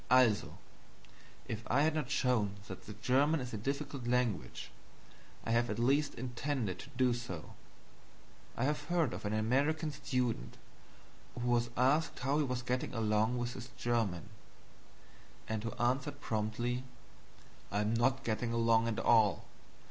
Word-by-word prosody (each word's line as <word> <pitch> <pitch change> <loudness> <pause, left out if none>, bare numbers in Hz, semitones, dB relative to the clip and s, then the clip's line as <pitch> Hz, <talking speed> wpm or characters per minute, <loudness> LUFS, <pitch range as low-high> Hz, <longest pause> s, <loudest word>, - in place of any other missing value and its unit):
"ALSO!" 125 -4 +4 0.9
If 110 -1 -3
I 140 +4 +3
had 160 0 +3
not 150 -5 -2
shown 120 -8 +1
that 95 - -9
the 105 - -6
German 135 +8 +3
is 125 -2 -5
a - - -2
difficult 140 +2 -3
language, 120 - -1 0.7
I - - -1
have 120 +1 +2
at 105 - -2
least 140 +5 +2
intended 125 -4 -2
to - - -9
do 130 -1 +4
so. 120 -9 -6 1.0
I 120 - 0
have 145 +3 0
heard 175 -2 +1
of - - -6
an 105 - -1
American 140 +8 +1
student 125 - -2 0.8
who 120 - -2
was 120 -1 +2
asked 140 +6 +3
how 140 +4 +1
he - - +3
was 125 -2 -2
getting 125 0 -2
along 110 +2 +2
with 120 0 -2
his 125 -1 -7
German, 110 -9 0 1.2
and 110 -1 -2
who 115 - -2
answered 130 +4 0
promptly: 120 +1 -1 0.9
"I 105 +1 +1
am 105 +1 +1
not 125 +3 +2
getting 115 +1 -1
along 115 -1 +3
at 115 - -1
all. 110 -3 +4
120 Hz, 150 wpm, -34 LUFS, 110-135 Hz, 1.2 s, ALSO